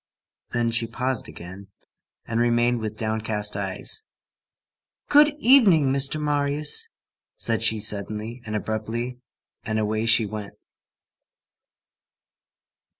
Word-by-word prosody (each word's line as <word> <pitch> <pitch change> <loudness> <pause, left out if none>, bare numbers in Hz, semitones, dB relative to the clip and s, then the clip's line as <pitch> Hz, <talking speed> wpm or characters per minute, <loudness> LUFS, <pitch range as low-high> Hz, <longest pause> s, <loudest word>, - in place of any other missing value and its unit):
Then 120 -1 -1
she 115 0 -1
paused 125 +2 -3
again, 95 +3 -11 0.6
and 115 0 -2
remained 120 0 +2
with 110 -1 -5
downcast 110 -2 -2
eyes. 100 - -4 1.0
"Good 295 +1 +7
evening, 200 - +5
Mr. 140 +2 +3
Marius," 145 0 +1 0.5
said 115 -2 0
she 110 -1 +2
suddenly 110 +3 -1
and 110 -2 -5
abruptly; 110 +4 -4 0.4
and 110 +1 -3
away 110 +1 -1
she 115 -1 +4
went. 105 -1 -7
115 Hz, 100 wpm, -24 LUFS, 110-130 Hz, 1.0 s, Good